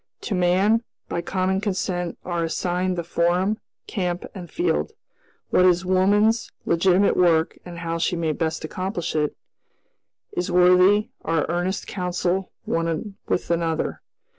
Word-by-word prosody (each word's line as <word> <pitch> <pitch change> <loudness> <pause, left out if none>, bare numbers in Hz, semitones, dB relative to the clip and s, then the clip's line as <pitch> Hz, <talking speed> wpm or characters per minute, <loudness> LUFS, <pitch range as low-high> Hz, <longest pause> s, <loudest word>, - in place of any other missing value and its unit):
To - - -3
man, 190 +5 +3 0.3
by 170 - -1
common 190 +2 0
consent, 185 -4 -2
are 175 -2 -1
assigned 180 +2 -1
the 170 - -1
forum, 175 +5 +1 0.3
camp, 180 -3 -2
and 180 -4 -8
field. 350 +2 0 0.6
What 180 - +5
is 180 0 +4
woman's 205 +5 +3
legitimate 185 +3 +3
work 165 -3 +3
and 175 -1 -8
how 165 -1 -3
she 175 - +1
may 165 -2 0
best 160 0 -2
accomplish 185 0 -3
it, 150 -1 0 0.9
is 180 +1 -2
worthy 180 +3 +5
our 165 -2 +1
earnest 175 +3 -1
counsel 180 0 -2
one 165 +4 -2
with 175 - -1
another. 165 -1 -1
180 Hz, 135 wpm, -23 LUFS, 170-190 Hz, 0.9 s, What